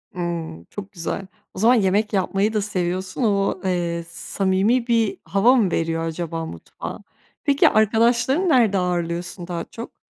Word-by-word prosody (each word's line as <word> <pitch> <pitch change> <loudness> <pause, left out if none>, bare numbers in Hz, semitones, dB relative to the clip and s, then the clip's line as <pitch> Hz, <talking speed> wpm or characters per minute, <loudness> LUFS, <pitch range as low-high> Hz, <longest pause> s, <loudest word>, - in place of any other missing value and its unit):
Imm, 170 - -4
çok 200 0 -8
güzel. 185 +1 -4 0.3
O - - -8
zaman 235 +5 +5
yemek 210 0 +2
yapmayı 200 +2 +1
da 215 - +1
seviyorsun. 185 +2 -2
O, 200 -3 +1
eee, 170 -2 -1
samimi 195 +7 0
bir 230 -3 +2
hava 230 +7 +4
mı 205 -8 +2
veriyor 165 0 -1
acaba 165 0 -4
mutfağa? 160 - -8 0.4
Peki 280 -2 +4
arkadaşlarını 235 - +3
nerede 235 -9 +4
ağırlıyorsun 175 0 -2
daha 170 -2 -3
çok? 230 +1 -10
195 Hz, 145 wpm, -22 LUFS, 175-225 Hz, 0.4 s, zaman